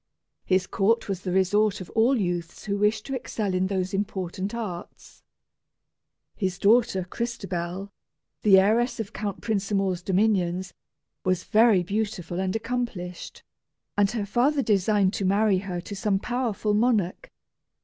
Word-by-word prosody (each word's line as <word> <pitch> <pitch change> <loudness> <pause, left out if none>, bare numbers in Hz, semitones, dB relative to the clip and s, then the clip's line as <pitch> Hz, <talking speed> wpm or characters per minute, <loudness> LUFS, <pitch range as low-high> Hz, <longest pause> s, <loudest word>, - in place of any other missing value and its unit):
His 185 0 +2
court 225 +5 +1
was 195 -2 -3
the 185 - -3
resort 195 +3 +2
of 185 - -9
all 235 +3 +3
youths 175 -3 -3
who 200 -1 -1
wished 210 +1 +1
to 270 - -5
excel 215 -5 -3
in 185 +1 +1
those 190 -1 -2
important 195 0 -3
arts. 195 -7 -7 1.1
His 190 -3 -2
daughter 210 -1 +3
Crystabell, 195 -4 -4 0.5
the 200 -2 +6
heiress 225 +6 +3
of 220 -1 -5
Count 200 -1 -4
Prinsamour's 195 -4 0
dominions, 185 -2 +1 0.5
was 185 -1 0
very 220 -4 +4
beautiful 185 -3 -3
and 190 +1 -1
accomplished, 225 -7 -4 0.5
and 205 -1 +3
her 215 -2 -2
father 265 +7 +2
designed 200 -2 +2
to - - -2
marry 200 0 +3
her 185 -2 -4
to 200 - -7
some 200 0 +1
powerful 225 -2 -1
monarch. 210 -5 +1
200 Hz, 140 wpm, -26 LUFS, 185-220 Hz, 1.1 s, the